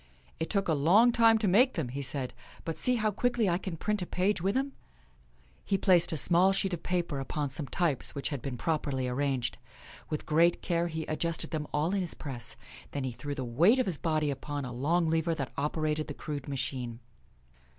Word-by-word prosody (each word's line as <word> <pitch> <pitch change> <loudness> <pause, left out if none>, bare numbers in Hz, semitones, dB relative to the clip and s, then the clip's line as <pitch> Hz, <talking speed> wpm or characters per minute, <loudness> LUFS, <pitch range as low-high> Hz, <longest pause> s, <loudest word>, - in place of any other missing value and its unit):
" - - -31
It 160 - -2
took 200 -2 0
a 165 - +2
long 185 +12 +5
time 230 -1 +5
to 215 -2 0
make 245 +8 +5
them," 155 -9 -2
he 135 +3 -4
said; 135 -1 -2 0.3
"but 165 - -4
see 250 - +3
how 215 -2 +1
quickly 240 +1 +1
I 175 0 +1
can 185 -3 -5
print 210 +4 0
a 180 - -3
page 185 0 0
with 195 +3 0
them." 275 +1 0 0.9
He 195 - +1
placed 180 -4 +5
a 160 - -1
small 180 +5 +5
sheet 195 -1 0
of 170 - -3
paper 170 -5 -1
upon 140 +1 -3
some 140 +1 -3
types 150 +1 -1
which 140 - -2
had 140 -5 -4
been 135 -3 -4
properly 140 -2 -1
arranged. 130 -1 -1 0.5
With 155 - -3
great 165 +3 +3
care 170 -1 0
he 160 -1 -4
adjusted 165 +1 -1
them 150 -2 -3
all 155 +5 0
in 200 - +1
his 175 - -4
press. 125 -6 -5 0.4
Then 140 - -2
he 130 - -2
threw 145 +4 -5
the 135 - -3
weight 165 - +4
of 255 - +2
his 175 -6 -2
body 155 -3 0
upon 145 +1 -4
a 125 - -6
long 160 +7 +1
lever 165 +1 +1
that 135 -4 -4
operated 150 +1 -1
the - - -6
crude 145 -3 -5
machine. 125 -4 -4
160 Hz, 215 wpm, -30 LUFS, 140-185 Hz, 0.9 s, long